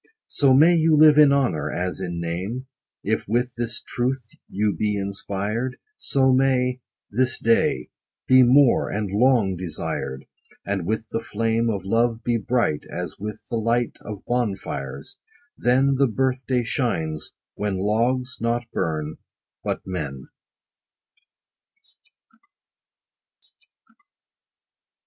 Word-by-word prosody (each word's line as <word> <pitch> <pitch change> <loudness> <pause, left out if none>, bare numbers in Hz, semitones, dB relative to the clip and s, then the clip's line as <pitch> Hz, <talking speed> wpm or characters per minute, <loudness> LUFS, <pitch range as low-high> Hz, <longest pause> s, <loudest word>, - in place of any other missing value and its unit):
So 135 -3 +4
may 160 +6 +6
you 160 -2 +4
live 150 0 +7
in 150 -2 +7
honor, 135 - +1
as 90 +1 -2
in 90 -2 -4
name, 95 +10 -4 0.4
If 110 +2 -1
with 120 +3 0
this 120 -1 -3
truth 125 -1 -3 0.2
you 105 -1 0
be 105 +3 0
inspired; 100 +5 -3 0.2
So 130 -1 +2
may 130 -1 +2 0.3
This 130 +4 +1
day 115 - +1 0.4
Be 130 0 +6
more, 130 +1 +5
and 100 -2 -3
long 110 -3 +3
desired; 75 -6 -4 0.4
And 95 -4 -2
with 110 +1 -2
the - - -2
flame 115 +1 0
Of 100 -4 -3
love 115 +2 +1
be 120 -1 +1
bright, 115 -8 0
As 90 0 -5
with 105 +1 -6
the 115 - 0
light 115 +2 0
Of 105 -2 -8
bonfires! 95 - -3 0.4
then 130 +3 +3
50 135 - +1
The 140 - +5
birth 130 +2 -1
day 125 -2 +1
shines, 85 - -2 0.2
when 100 -2 -2
logs 120 +6 0
not 120 +1 0
burn, 80 -1 -2 0.5
but - - -2
men. 75 -8 -5
115 Hz, 120 wpm, -23 LUFS, 95-130 Hz, 0.5 s, live